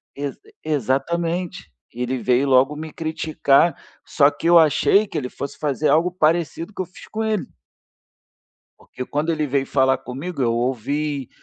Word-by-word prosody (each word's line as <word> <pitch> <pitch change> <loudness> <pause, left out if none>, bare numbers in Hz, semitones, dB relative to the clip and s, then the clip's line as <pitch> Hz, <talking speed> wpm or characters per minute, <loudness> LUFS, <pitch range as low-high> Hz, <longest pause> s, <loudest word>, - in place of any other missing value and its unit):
exa 140 0 -4 0.3
exatamente. 165 - -1 0.2
E 120 - -7
ele 130 +1 -1
veio 125 +3 +1
logo 135 +3 +4
me 155 0 -7
criticar, 160 -1 +1 0.3
só 145 -2 +4
que 165 - -4
eu 170 -1 +8
achei 195 +6 +4
que 165 - -5
ele 125 -4 -3
fosse 140 - -7
fazer 150 0 0
algo 165 +5 +3
parecido 170 +2 0
que 190 - -4
eu - - -3
fiz 185 - -15
com 220 +1 -3
ele. 215 -3 -1 1.3
Porque 125 - -8
quando 150 +3 -1
ele 155 -2 -1
veio 135 0 0
falar 130 -1 +2
comigo, 140 +4 -6
eu 115 -2 +2
ouvi, 135 +3 -2
150 Hz, 165 wpm, -21 LUFS, 135-170 Hz, 1.3 s, eu